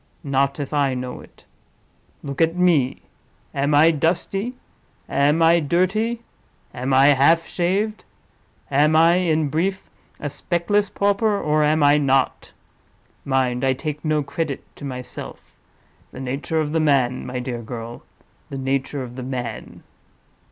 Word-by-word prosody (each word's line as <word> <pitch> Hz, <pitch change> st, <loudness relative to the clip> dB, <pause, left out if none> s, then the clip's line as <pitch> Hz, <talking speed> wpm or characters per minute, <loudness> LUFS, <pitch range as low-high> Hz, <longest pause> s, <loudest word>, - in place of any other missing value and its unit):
Not 140 Hz, 0 st, 0 dB
if 145 Hz, +1 st, -5 dB
I 140 Hz, -3 st, +1 dB
know 125 Hz, 0 st, -5 dB
it! -, -, -19 dB, 0.8 s
Look 140 Hz, +2 st, -4 dB
at 165 Hz, +1 st, +3 dB
me. 170 Hz, -8 st, +2 dB, 0.5 s
Am 145 Hz, +2 st, +1 dB
I 160 Hz, +3 st, +6 dB
dusty? 195 Hz, -, -1 dB, 0.5 s
am 150 Hz, +4 st, +2 dB
I 165 Hz, +1 st, +5 dB
dirty? 195 Hz, +9 st, 0 dB, 0.5 s
am 130 Hz, +2 st, -3 dB
I 135 Hz, +2 st, +6 dB
half 155 Hz, +4 st, +4 dB
shaved? 195 Hz, +5 st, -1 dB, 0.7 s
Am 150 Hz, +3 st, +3 dB
I, 165 Hz, +2 st, +5 dB
in 160 Hz, -4 st, +1 dB
brief, 190 Hz, +6 st, -2 dB, 0.3 s
a 150 Hz, -, -4 dB
speckless 175 Hz, +7 st, 0 dB
pauper, 205 Hz, +1 st, +1 dB
or 150 Hz, 0 st, +1 dB
am 150 Hz, 0 st, +2 dB
I 145 Hz, +1 st, +5 dB
not? 135 Hz, -2 st, 0 dB, 0.7 s
Mind! 130 Hz, -2 st, 0 dB
I 130 Hz, 0 st, +3 dB
take 150 Hz, +2 st, -5 dB
no 155 Hz, -2 st, +1 dB
credit 140 Hz, 0 st, -4 dB
to 145 Hz, -, -8 dB
myself; 125 Hz, -2 st, -8 dB, 0.6 s
the -, -, -10 dB
nature 135 Hz, +5 st, -2 dB
of 150 Hz, -1 st, -1 dB
the 160 Hz, -, +1 dB
man, 135 Hz, -5 st, +2 dB
my 125 Hz, 0 st, -5 dB
dear 125 Hz, -1 st, -4 dB
girl—the 115 Hz, +3 st, -10 dB
nature 135 Hz, +1 st, -2 dB
of 120 Hz, -1 st, -9 dB
the 130 Hz, -, -6 dB
man!" 120 Hz, -4 st, -6 dB
145 Hz, 140 wpm, -22 LUFS, 135-165 Hz, 0.8 s, I